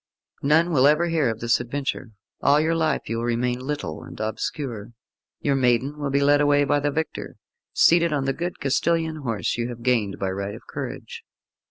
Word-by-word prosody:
None 160 Hz, +5 st, +3 dB
will 135 Hz, -3 st, +5 dB
ever 160 Hz, +4 st, +3 dB
hear 160 Hz, -6 st, +2 dB
of 115 Hz, 0 st, -4 dB
this 120 Hz, 0 st, +2 dB
adventure; 130 Hz, 0 st, -4 dB, 0.3 s
all 145 Hz, +1 st, +4 dB
your 160 Hz, +2 st, +1 dB
life 160 Hz, -3 st, 0 dB
you 115 Hz, -, -2 dB
will 115 Hz, -, -2 dB
remain 120 Hz, +1 st, 0 dB
little 135 Hz, -, -4 dB
and -, -, -11 dB
obscure. 110 Hz, +1 st, -4 dB, 0.5 s
Your 140 Hz, -, +1 dB
maiden 130 Hz, +2 st, +1 dB
will 145 Hz, -1 st, -2 dB
be 140 Hz, +1 st, +1 dB
led 145 Hz, +1 st, +4 dB
away 145 Hz, 0 st, +4 dB
by 145 Hz, +1 st, +2 dB
the 145 Hz, +1 st, 0 dB
victor, 160 Hz, +2 st, -4 dB, 0.4 s
seated 170 Hz, 0 st, +4 dB
on 140 Hz, -3 st, 0 dB
the 135 Hz, -, +1 dB
good 175 Hz, +5 st, -4 dB
Castilian 160 Hz, +3 st, 0 dB
horse 120 Hz, -5 st, -2 dB
you 120 Hz, +1 st, -1 dB
have 120 Hz, -1 st, -8 dB
gained 115 Hz, -6 st, +1 dB
by 95 Hz, -1 st, -2 dB
right 100 Hz, +1 st, -4 dB
of -, -, -13 dB
courage. -, -, -7 dB
140 Hz, 195 wpm, -24 LUFS, 120-150 Hz, 0.5 s, will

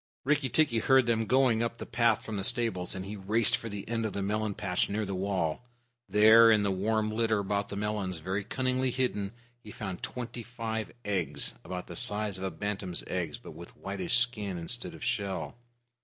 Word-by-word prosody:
Rikki 145 Hz, -2 st, +1 dB
tikki 145 Hz, -5 st, +3 dB
heard 130 Hz, +2 st, +4 dB
them 115 Hz, -2 st, +1 dB
going 130 Hz, -4 st, +3 dB
up 115 Hz, 0 st, -2 dB
the -, -, -6 dB
path 115 Hz, -2 st, +2 dB
from 110 Hz, -, -4 dB
the 100 Hz, -, -2 dB
stables, 95 Hz, -6 st, +1 dB
and 95 Hz, 0 st, -5 dB
he 105 Hz, +2 st, -6 dB
raced 110 Hz, +4 st, +3 dB
for 115 Hz, -, -6 dB
the 100 Hz, -1 st, -6 dB
end 115 Hz, 0 st, -1 dB
of 110 Hz, -3 st, -2 dB
the 100 Hz, -, -2 dB
melon 105 Hz, 0 st, -1 dB
patch 90 Hz, -4 st, 0 dB
near 105 Hz, +1 st, -1 dB
the 100 Hz, -, -4 dB
wall. 95 Hz, -2 st, -1 dB, 0.5 s
There, 110 Hz, +2 st, +8 dB
in 105 Hz, -2 st, +5 dB
the 100 Hz, -, +1 dB
warm 110 Hz, +3 st, 0 dB
litter 110 Hz, 0 st, +1 dB
above 100 Hz, 0 st, -1 dB
the 100 Hz, -, -6 dB
melons, 100 Hz, -3 st, -2 dB
very 95 Hz, +5 st, -3 dB
cunningly 130 Hz, +3 st, 0 dB
hidden, 120 Hz, -6 st, -1 dB, 0.3 s
he 110 Hz, -, -13 dB
found 95 Hz, -4 st, -6 dB
twenty 120 Hz, -1 st, -5 dB
five 115 Hz, -2 st, -4 dB
eggs, 85 Hz, -8 st, 0 dB
about 90 Hz, -1 st, -5 dB
the 85 Hz, -, -9 dB
size 105 Hz, +1 st, +2 dB
of -, -, -6 dB
a 95 Hz, -, 0 dB
bantam's 100 Hz, -3 st, -3 dB
eggs, 85 Hz, -5 st, -3 dB
but -, -, -11 dB
with 85 Hz, +2 st, -12 dB
whitish 95 Hz, +3 st, -1 dB
skin 110 Hz, -6 st, 0 dB
instead 85 Hz, -1 st, -2 dB
of -, -, -10 dB
shell. 100 Hz, +2 st, -2 dB
105 Hz, 200 wpm, -30 LUFS, 95-115 Hz, 0.5 s, There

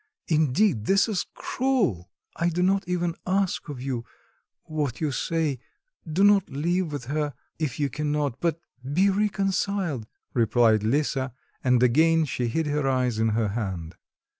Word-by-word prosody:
Indeed, 150 Hz, -, +2 dB
this 195 Hz, +2 st, +4 dB
is 210 Hz, -5 st, -1 dB
cruel!" 200 Hz, -, 0 dB, 0.3 s
"I 170 Hz, 0 st, +1 dB
do 175 Hz, +2 st, 0 dB
not 195 Hz, +1 st, +2 dB
even 175 Hz, -1 st, 0 dB
ask 190 Hz, -3 st, 0 dB
of 140 Hz, -4 st, -6 dB
you... 130 Hz, -3 st, -2 dB, 0.6 s
what 150 Hz, -6 st, -3 dB
you 155 Hz, -3 st, 0 dB
say; 155 Hz, -2 st, -1 dB, 0.5 s
do 185 Hz, +6 st, +2 dB
not 205 Hz, -2 st, +5 dB
live 165 Hz, +4 st, -1 dB
with 145 Hz, -5 st, -5 dB
her, 145 Hz, +1 st, -2 dB, 0.2 s
if 155 Hz, -4 st, -2 dB
you 145 Hz, -, +2 dB
cannot; 145 Hz, -2 st, -2 dB
but 165 Hz, -1 st, 0 dB, 0.3 s
be 195 Hz, +5 st, +4 dB
reconciled," 195 Hz, -, 0 dB, 0.3 s
replied 115 Hz, -2 st, +3 dB
Lisa 130 Hz, +2 st, 0 dB, 0.3 s
and 125 Hz, -1 st, +3 dB
again 160 Hz, +6 st, +4 dB
she 125 Hz, -3 st, -2 dB
hid 160 Hz, +8 st, 0 dB
her 145 Hz, -1 st, 0 dB
eyes 125 Hz, -4 st, +1 dB
in 110 Hz, 0 st, +3 dB
her 110 Hz, -3 st, +1 dB
hand. 95 Hz, -7 st, -4 dB
150 Hz, 150 wpm, -26 LUFS, 125-180 Hz, 0.6 s, not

